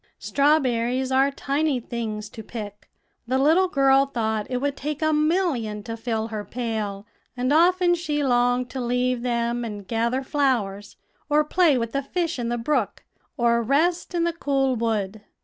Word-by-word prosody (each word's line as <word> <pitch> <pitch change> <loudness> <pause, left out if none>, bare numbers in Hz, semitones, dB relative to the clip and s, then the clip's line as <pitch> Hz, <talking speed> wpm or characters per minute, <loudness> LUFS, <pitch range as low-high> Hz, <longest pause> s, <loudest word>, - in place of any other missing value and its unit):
"Strawberries 260 -3 +1
are 265 +1 +4
tiny 280 0 -1
things 220 -3 -5
to 220 - -9
pick; 210 -2 -8 0.4
the 260 +2 +1
little 320 +7 +4
girl 275 -3 +4
thought 220 -5 -2
it 250 - -1
would 285 +2 -1
take 300 +2 -4
a 310 0 +2
million 300 - 0
to 225 0 -5
fill 225 -1 -3
her 215 -2 -4
pail; 215 -4 -4 0.3
and 255 +3 +1
often 350 +2 +4
she 305 -4 -1
longed 245 -1 +2
to 265 - -4
leave 250 0 0
them 235 0 -1
and 205 -4 -6
gather 235 +4 0
flowers, 230 -8 -1 0.3
or 300 +1 +4
play 310 -2 +3
with 230 -1 -2
the 275 - -1
fish 335 +1 -2
in 235 -1 -2
the 240 - -1
brook, 290 +6 -1 0.3
or 235 -1 +3
rest 330 +9 +1
in 340 - +1
the 340 0 0
cool 270 -5 0
wood. 220 -3 -2
250 Hz, 165 wpm, -24 LUFS, 230-290 Hz, 0.4 s, are